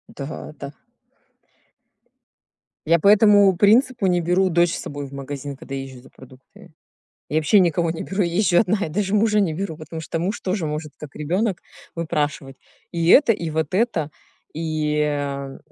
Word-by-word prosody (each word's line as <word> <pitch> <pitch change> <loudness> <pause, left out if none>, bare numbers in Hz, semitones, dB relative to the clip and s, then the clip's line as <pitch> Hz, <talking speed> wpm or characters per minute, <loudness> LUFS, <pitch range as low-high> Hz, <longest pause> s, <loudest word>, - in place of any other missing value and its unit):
Да-да. 140 0 -8 2.2
Я 170 +1 +4
по 200 - +1
этому 205 -2 +6
принципу 225 +1 +3
не 175 -1 +2
беру 180 +3 +2
дочь 170 0 +2
с - - -4
собой 145 0 -6
в 135 - -12
магазин, 140 0 -6
когда 135 - -8
езжу 135 -2 -7
за - - -18
продуктами. 130 0 -17 0.6
Я 155 - +1
вообще 160 +7 +4
никого 170 -1 +1
не 165 - -4
беру, 195 +1 -2
я 170 -1 -1
езжу 180 -3 +3
одна 200 -3 0
и - - -6
даже 195 +4 -2
мужа 210 0 +3
не 185 -5 +1
беру, 165 0 -4
потому 160 +1 -8
что 165 +1 -4
муж 185 +6 -2
тоже 185 -2 -2
может, 150 0 -5
как 150 -2 -11
ребенок, 185 +6 -1 0.4
выпрашивать 150 -4 -3 0.4
и 170 -1 -1
это, 255 0 +6
и 170 -5 -4
вот 160 +2 -2
это. 185 -9 0 0.4
И, 155 -1 -1
а, 140 -2 -3
165 Hz, 170 wpm, -22 LUFS, 150-195 Hz, 2.2 s, этому